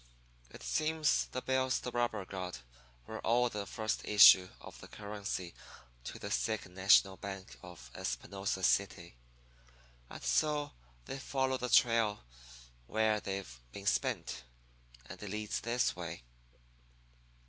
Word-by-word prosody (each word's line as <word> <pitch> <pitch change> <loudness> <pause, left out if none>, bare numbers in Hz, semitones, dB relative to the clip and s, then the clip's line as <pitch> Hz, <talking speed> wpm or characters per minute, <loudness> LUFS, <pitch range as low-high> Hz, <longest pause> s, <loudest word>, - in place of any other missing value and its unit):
It - - -12
seems 155 - +1
the 130 - -5
bills 130 0 +1
the 125 - -5
robber 120 -5 -1
got 90 -7 -6 0.4
were - - -7
all 120 +2 +2
the 100 -1 -4
first 110 -2 -2
issue 95 -3 +8
of - - -12
currency 100 -4 -5 0.5
to - - -6
the - - -6
Second 90 - -2
National 95 0 +5
Bank 95 -1 -7
of 85 -10 -12
Espinosa 95 -1 -3
City. 90 -6 +1 0.9
And - - -10
so 145 - +1 0.3
they've 135 0 -6
followed 130 -1 -1
the 125 - -3
trail 115 - +3 0.6
where 110 - +1
they've 95 -12 -6
been - - -8
spent, 60 +1 -1 0.6
and - - -10
it 105 - -6
leads 105 +2 -3
this 120 +2 0
way.' 85 -6 -7
105 Hz, 125 wpm, -33 LUFS, 90-120 Hz, 0.9 s, issue